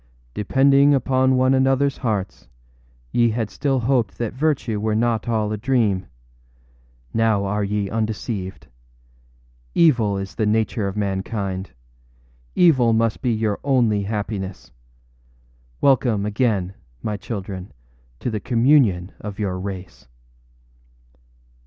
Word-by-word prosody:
âDepending 140 - +4
upon 130 0 +2
one 130 +1 +3
anotherâs 135 +1 +2
hearts, 105 - -3 0.6
ye 120 -1 +3
had 110 -1 -2
still 135 -2 0
hoped 120 -4 0
that 115 -2 -3
virtue 130 -6 0
were 110 0 0
not 115 0 0
all 110 -2 0
a 110 - -2
dream. 105 -5 +1 1.1
Now 110 -3 +2
are 105 +1 -1
ye 100 0 -1
undeceived. 110 -2 -3 1.1
Evil 120 -12 +3
is 95 0 -5
the 110 -2 0
nature 110 -1 0
of 100 +1 -5
mankind. 95 -1 -3 0.9
Evil 130 -10 +4
must 115 0 +1
be 125 - +1
your 110 -2 -1
only 120 -7 +2
happiness. 100 -2 -4 1.1
Welcome 120 -7 +3
again, 105 -4 0 0.3
my 105 - -2
children, 95 -2 -6 0.5
to 125 - -2
the 110 - -2
communion 115 -6 +3
of 100 -1 -7
your 95 -3 -2
race. 95 -5 -7
110 Hz, 115 wpm, -22 LUFS, 100-125 Hz, 1.1 s, âDepending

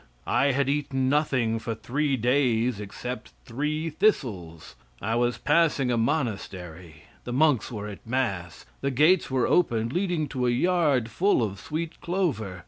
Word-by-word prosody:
I - - +2
had 140 0 +1
eaten 135 -2 0
nothing 130 -6 +1
for 115 0 -4
three 140 +4 -1
days 120 -2 +1
except 125 +5 -7
three 150 +6 -2
thistles. 105 - -1 0.3
I 110 - -2
was 120 +1 +1
passing 150 -4 +2
a - - +2
monastery, 90 - -3 0.2
the 125 - -6
monks 140 -3 +2
were 105 -3 -5
at 105 +1 -10
mass. 100 -9 -2 0.2
The 140 - 0
gates 155 +7 +3
were 130 -2 +1
open 115 -10 +2
leading 175 0 -1
to 125 -3 -1
a - - +3
yard 140 -3 +2
full 185 - +2
of 100 -3 -3
sweet 160 - -5
clover. 140 - -2
125 Hz, 150 wpm, -26 LUFS, 110-150 Hz, 0.3 s, gates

